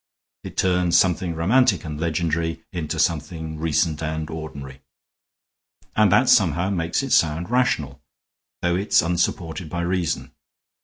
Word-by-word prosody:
It - - -9
turns 90 -2 +2
something 90 -2 +1
romantic 100 +2 +3
and 75 -1 -5
legendary 80 0 -1
into 85 -4 -4
something 80 0 -2
recent 80 0 0
and 80 0 -3
ordinary. 70 -4 -8 1.1
And 105 -3 +4
that 125 +6 +4
somehow 90 -2 +3
makes 85 +5 -1
it 135 - -4
sound 80 +5 +2
rational, 75 - 0 0.6
though 85 0 +2
it 100 +2 -3
is - - +5
unsupported 85 -1 -2
by 85 +1 -3
reason. 90 -1 -2
85 Hz, 135 wpm, -23 LUFS, 80-90 Hz, 1.1 s, is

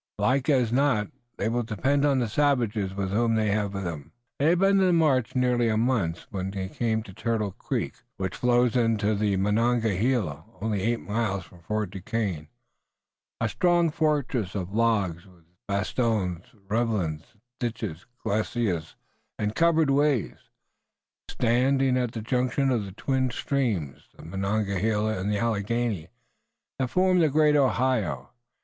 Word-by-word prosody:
Like 135 +2 +1
as 125 -6 +3
not 125 -5 +2 0.3
they 100 - -1
will 120 +2 0
depend 130 +6 0
on 140 -2 +3
the 120 -2 +1
savages, 115 -6 +1
whom 100 +4 0
they 110 -2 +1
have 100 -1 -1
with 100 - -3
them." 80 -5 -6 0.3
They 145 - +3
had 175 - +4
been 195 +2 +4
on 190 - +4
the 180 - +3
march 140 -8 +2
nearly 125 -2 +2
a 110 - +1
month 110 -8 0
when 95 -2 -3
they 95 -1 -4
came 110 0 -1
to 95 - -12
Turtle 110 -1 -1
Creek, - - -3 0.2
which 95 -1 -3
flows 125 -1 +2
into 115 -3 +2
the 100 -1 +1
Monongahela 110 - +1 0.2
only 105 -1 -1
eight 115 +3 0
miles 105 -3 -1
from 90 - -17
Fort 105 +3 -3
Duquesne 95 -5 -3 0.9
a 115 - +1
strong 175 - +2
fortress 140 - 0
of 95 -1 -4
logs 105 -6 +1
with 90 -3 -21 0.2
bastions, 100 -3 -1 0.2
ravelins, 100 -9 -1 0.2
ditch, 120 -2 -2 0.4
glacis 100 -5 -1 0.4
and 105 0 -1
covered 165 0 +3
ways, 140 - +2 1.0
standing 130 +2 +2
at 125 -2 -1
the 115 - -4
junction 130 +3 +1
of 115 -5 0
the 95 - -8
twin 130 +5 0
streams, 115 - -2
the - - -12
Monongahela 105 +3 -1
and 100 +3 -1
the 105 - +1
Alleghany, 110 -4 -1 0.7
that 130 -2 0
form 185 +2 +3
the 160 -3 +4
great 150 +1 +4
Ohio. 125 - +1
115 Hz, 150 wpm, -26 LUFS, 100-130 Hz, 1.0 s, had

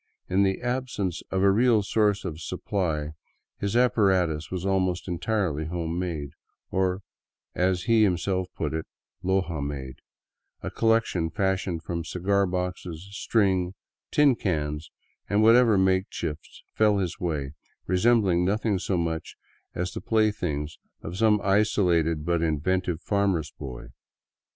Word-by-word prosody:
In 95 +2 +2
the 95 +3 +1
absence 120 -8 -2
of 95 0 0
a 100 - +6
real 115 0 +4
source 105 0 +1
of 80 -2 -5
supply 80 -6 -2 0.5
his 100 +2 -2
apparatus 95 -10 +2
was 90 0 -4
almost 95 -2 0
entirely 90 -4 -1
home 85 +1 -3
made, 80 -6 -3 0.4
or, 95 0 0 0.5
as 90 0 +1
he 115 +2 +4
himself 95 -1 +1
put - - -2
it, 80 0 -3 0.2
" 90 +1 -43
Loja 95 -4 0
made," 70 -2 -6 0.6
a - - -4
collection 115 -7 +1
fashioned 95 -2 -1
from 85 -1 -3
cigar 100 +4 +1
boxes, 90 -1 -4
string, 95 -4 +1 0.3
tin 145 -2 +5
cans, 75 -6 -2 0.4
and 105 +1 +3
whatever 115 -1 +6
makeshifts 95 -5 -1
fell 105 -1 +3
in 100 - +1
his 90 -2 -3
way, 75 -6 -2 0.3
resembling 95 -2 +3
nothing 105 +1 +1
so 90 +1 -1
much 80 -1 -3 0.4
as 90 +1 -2
the - - -5
play 110 -1 +2
things 75 -6 -4 0.2
of 80 - -6
some 105 +1 +3
isolated 90 -6 +2
but 85 -1 +1
inventive 85 +2 0
farmer's 95 -7 0
boy. 65 -4 -8
95 Hz, 135 wpm, -26 LUFS, 85-100 Hz, 0.6 s, a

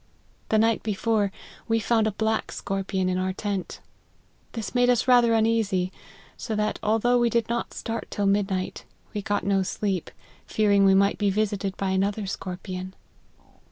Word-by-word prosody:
The 220 - +3
night 225 0 +3
before, 210 -1 0 0.4
we 225 -1 +2
found 225 0 +2
a - - 0
black 220 +2 -1
scorpion 195 -1 -2
in 185 0 0
our 185 0 -1
tent; 200 -1 -4 0.7
this 225 -3 -5
made 245 0 +3
us 245 0 +2
rather 240 -2 +5
uneasy; 220 -5 +1 0.4
so 220 - -4
that, 210 0 -1
although 225 +3 +2
we 240 -1 +3
did 230 0 +1
not 235 0 -2
start 230 0 -4
till 205 - -2
midnight, 195 -2 0 0.3
we 210 - -2
got 205 0 -1
no 195 -1 +2
sleep, 190 -1 -2 0.4
fearing 200 -2 +3
we 195 0 +6
might 200 +1 +3
be 205 -1 +2
visited 200 -1 -1
by 195 -1 -1
another 200 +2 0
scorpion. 185 0 -6
205 Hz, 160 wpm, -25 LUFS, 195-225 Hz, 0.7 s, we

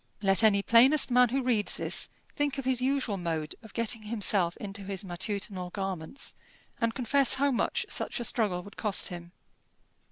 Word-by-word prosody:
Let 195 +2 +4
any 200 -2 +4
plainest 260 +6 +5
man 250 0 +5
who 265 +2 -1
reads 230 -5 +1
this - - -1 0.3
think 290 -1 -1
of 275 - -5
his 255 -1 0
usual 260 -5 0
mode 160 -4 -3
of 220 -3 -14
getting 230 -1 -1
himself 205 -5 0
into 200 0 -7
his 195 -1 -4
matutinal 185 0 -4
garments, 190 - -5 0.5
and 230 0 0
confess 270 +2 +4
how 280 +1 +1
much 245 - -1
such - - -3
a - - -3
struggle 205 -7 0
would 205 - -14
cost 210 -3 +1
him. 175 -1 -9
215 Hz, 170 wpm, -28 LUFS, 195-250 Hz, 0.5 s, plainest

